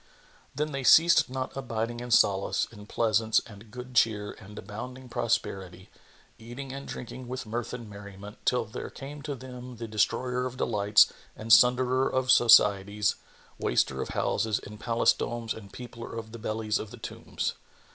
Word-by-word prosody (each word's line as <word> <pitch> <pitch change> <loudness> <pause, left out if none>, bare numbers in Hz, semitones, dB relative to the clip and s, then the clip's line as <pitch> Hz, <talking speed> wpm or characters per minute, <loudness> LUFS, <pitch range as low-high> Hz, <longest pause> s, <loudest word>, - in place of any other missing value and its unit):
Then 150 +1 -1
they 135 -1 -3
ceased 165 +4 +6
not 130 0 -4
abiding 120 -3 -3
in 120 0 -7
solace 100 -4 +3
and 105 -2 -13
pleasance 110 -1 +2
and 105 0 -13
good 125 +3 -9
cheer 105 -4 +2
and 105 +2 -13
abounding 125 +5 -8
prosperity, 95 -6 -2 0.5
eating 120 +4 -8
and 140 0 -7
drinking 125 +1 -7
with 130 0 -5
mirth 115 +2 -4
and 120 -2 -7
merriment, 100 0 -11
till 125 -2 +1
there 110 +3 -7
came 145 +2 -9
to 145 -1 -4
them 125 -1 -9
the 115 0 -6
Destroyer 125 +4 0
of 130 0 -9
delights 105 -3 +4 0.2
and 110 0 +2
Sunderer 125 +2 +5
of 130 -1 +2
societies, 105 -3 +5 0.5
Waster 65 0 +1
of - - -4
houses 110 -2 0
and 105 +1 -10
palace 115 +1 +3
domes 115 -1 -3
and 100 -3 -11
Peopler 115 -2 -9
of 110 -1 -7
the 115 - -9
bellies 110 0 -1
of 110 - -6
the - - -11
tombs. - - -4
115 Hz, 165 wpm, -28 LUFS, 105-125 Hz, 0.5 s, ceased